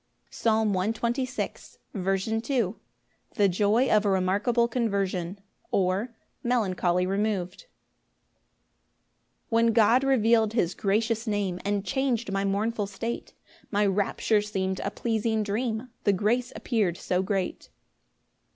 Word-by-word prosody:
Psalm 220 Hz, -2 st, +1 dB
126:2. 235 Hz, +6 st, -2 dB, 0.4 s
C. 220 Hz, +4 st, -3 dB
M. 230 Hz, -3 st, 0 dB, 0.6 s
The 205 Hz, -2 st, +4 dB
joy 210 Hz, +7 st, +2 dB
of 215 Hz, -3 st, +4 dB
a 205 Hz, -, +1 dB
remarkable 200 Hz, +6 st, +2 dB
conversion; 200 Hz, -6 st, -1 dB, 0.3 s
or, 190 Hz, +5 st, +1 dB, 0.3 s
Melancholy 185 Hz, -7 st, +1 dB
removed. 200 Hz, -, -2 dB, 1.8 s
1 230 Hz, 0 st, +3 dB
When 230 Hz, -, +3 dB
God 230 Hz, +4 st, +5 dB
reveal'd 230 Hz, -4 st, +3 dB
his 180 Hz, -7 st, +1 dB
gracious 220 Hz, +3 st, 0 dB
Name, 200 Hz, -4 st, -1 dB
And 205 Hz, 0 st, -1 dB
chang'd 255 Hz, -5 st, -1 dB
my 195 Hz, 0 st, 0 dB
mournful 205 Hz, +2 st, 0 dB
state, 225 Hz, +4 st, -5 dB, 0.3 s
My 205 Hz, -1 st, +2 dB
rapture 205 Hz, +2 st, +1 dB
seem'd 190 Hz, -2 st, -2 dB
a -, -, -2 dB
pleasing 220 Hz, -1 st, -1 dB
dream, 220 Hz, +3 st, -2 dB, 0.2 s
The 205 Hz, -, +4 dB
grace 235 Hz, +6 st, 0 dB
appear'd 205 Hz, -8 st, 0 dB
so 180 Hz, 0 st, 0 dB
great. 190 Hz, -1 st, -2 dB
210 Hz, 115 wpm, -27 LUFS, 195-230 Hz, 1.8 s, God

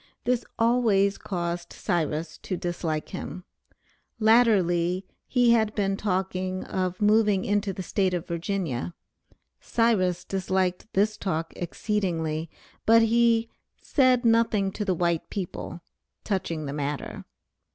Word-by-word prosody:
This 245 Hz, -1 st, +1 dB
always 225 Hz, -4 st, +3 dB
caused 175 Hz, -2 st, -3 dB
Cyrus 160 Hz, -3 st, -2 dB
to 185 Hz, -, -4 dB
dislike 170 Hz, -3 st, -3 dB
him. 185 Hz, -1 st, -6 dB, 0.8 s
Latterly 190 Hz, -6 st, +3 dB, 0.2 s
he 245 Hz, -2 st, +4 dB
had 220 Hz, -2 st, +2 dB
been 195 Hz, -2 st, +1 dB
talking 185 Hz, -1 st, -2 dB
of 185 Hz, +1 st, -2 dB
moving 210 Hz, -2 st, +3 dB
into 205 Hz, -1 st, +1 dB
the 190 Hz, 0 st, -6 dB
State 185 Hz, -1 st, 0 dB
of 175 Hz, -, -3 dB
Virginia. 170 Hz, -4 st, -3 dB, 0.6 s
Cyrus 210 Hz, -7 st, +1 dB
disliked 190 Hz, +1 st, -1 dB
this 210 Hz, +2 st, +2 dB
talk 165 Hz, -4 st, -2 dB
exceedingly, 170 Hz, -4 st, -2 dB, 0.4 s
but 230 Hz, +1 st, +7 dB
he 230 Hz, 0 st, +3 dB, 0.3 s
"said 255 Hz, -3 st, +3 dB
nothing 225 Hz, -4 st, +3 dB
to 210 Hz, -, -3 dB
the 190 Hz, -3 st, 0 dB
white 170 Hz, -1 st, 0 dB
people" 180 Hz, -3 st, -5 dB, 0.4 s
touching 170 Hz, -6 st, -2 dB
the 140 Hz, -, -4 dB
matter. 145 Hz, 0 st, -4 dB
190 Hz, 120 wpm, -26 LUFS, 175-215 Hz, 0.8 s, but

